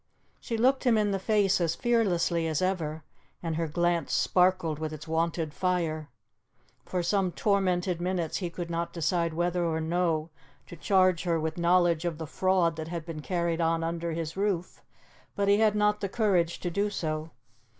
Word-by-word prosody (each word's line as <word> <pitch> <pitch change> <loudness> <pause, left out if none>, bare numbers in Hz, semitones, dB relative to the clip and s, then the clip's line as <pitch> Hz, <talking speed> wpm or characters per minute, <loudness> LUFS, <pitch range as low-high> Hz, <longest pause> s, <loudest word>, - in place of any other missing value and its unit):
She 230 - -4
looked 260 +4 +3
him 240 -4 +4
in 210 -1 +2
the 195 - -1
face 200 -2 +2
as 165 -1 +1
fearlessly 180 -8 +1
as 155 -2 0
ever, 160 -5 -2 0.4
and 165 -2 -2
her 165 0 -1
glance 175 +2 0
sparkled 180 -4 +2
with 155 0 -3
its 155 - -9
wonted 160 -1 -1
fire. 165 -5 -1 0.8
For 180 -1 -1
some 190 +1 +1
tormented 185 -3 0
minutes 175 -3 -1
he 180 -3 -3
could 170 0 -6
not 170 0 -2
decide 170 0 0
whether 175 +1 0
or 160 -1 0
no 165 -1 0 0.3
to - - -10
charge 185 0 +3
her 170 -2 +1
with 160 +2 -3
knowledge 170 -1 +3
of 170 -3 -2
the 160 - -5
fraud 175 0 +1
that 160 0 -5
had 165 -1 -5
been 165 -3 -6
carried 170 0 -1
on 165 0 +1
under 170 0 -2
his 165 -1 -4
roof, 195 -3 -2 0.5
but 200 0 0
he 200 0 +5
had 215 -1 +3
not 210 0 +2
the 200 - -2
courage 185 -6 +1
to 175 - -2
do 200 +4 0
so. 155 -4 -3
175 Hz, 180 wpm, -28 LUFS, 165-190 Hz, 0.8 s, he